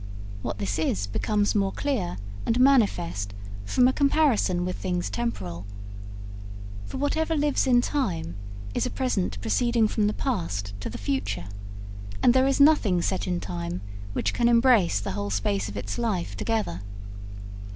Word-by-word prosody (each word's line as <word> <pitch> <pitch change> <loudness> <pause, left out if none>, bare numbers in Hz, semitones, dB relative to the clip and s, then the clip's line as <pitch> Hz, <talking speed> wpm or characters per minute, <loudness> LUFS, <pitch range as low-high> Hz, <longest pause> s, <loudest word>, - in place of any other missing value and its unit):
What 100 - -4
this 100 -1 -2
is 100 -11 0
becomes 205 - 0
more 195 -2 +1
clear 240 -12 -2 0.3
and 230 +2 +2
manifest 100 - +2 0.3
from 250 - +4
a 260 - +2
comparison 275 - +2
with 180 - -3
things 180 -2 -2
temporal. 95 - -4 1.2
For - - -6
whatever 315 +4 0
lives 290 -2 +1
in 245 -2 +5
time 190 - -2 0.4
is - - 0
a - - -3
present 100 - -1
proceeding 230 - +2
from 210 -1 +1
the 210 - 0
past 165 - -2
to 100 - -4
the - - -6
future, 100 -5 -2 0.7
and 240 - +6
there 260 +1 +4
is 275 - +1
nothing 250 - +5
set 190 -1 -1
in 180 -1 0
time 85 - -4 0.3
which - - -1
can 235 -1 +3
embrace 230 - +4
the 100 - -4
whole 100 +1 -3
space 100 0 -1
of 100 - -7
its 100 0 -4
life 210 -7 -1
together. 220 - -2
190 Hz, 155 wpm, -26 LUFS, -, 1.2 s, and